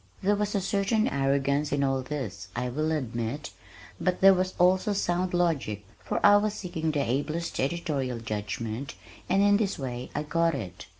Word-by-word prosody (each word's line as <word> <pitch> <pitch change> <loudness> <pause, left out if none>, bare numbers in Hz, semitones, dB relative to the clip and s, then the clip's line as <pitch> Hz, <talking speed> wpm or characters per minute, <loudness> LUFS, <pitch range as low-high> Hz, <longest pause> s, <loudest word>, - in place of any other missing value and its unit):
There 205 +2 +3
was 205 0 -1
a 200 - +1
certain 200 +3 +1
arrogance 140 +1 +1
in 145 -1 +1
all 135 -1 +1
this, 125 -10 -5
I 125 +1 -1
will 155 +5 -1
admit, 125 -1 -3 0.5
but 180 -1 0
there 195 0 +8
was 185 0 -1
also 185 +3 +3
sound 180 -1 0
logic, 145 - 0 0.2
for - - -1
I 205 0 +8
was 210 0 0
seeking 165 -4 -3
the 145 -2 0
ablest 150 +7 -2
editorial 135 -4 -1
judgment 110 +3 -4 0.3
and 195 +2 +4
in 205 0 +5
this 200 -2 -1
way 125 -2 -5
I - - -1
got 165 +1 +1
it. 95 -9 -7
150 Hz, 175 wpm, -28 LUFS, 130-185 Hz, 0.5 s, there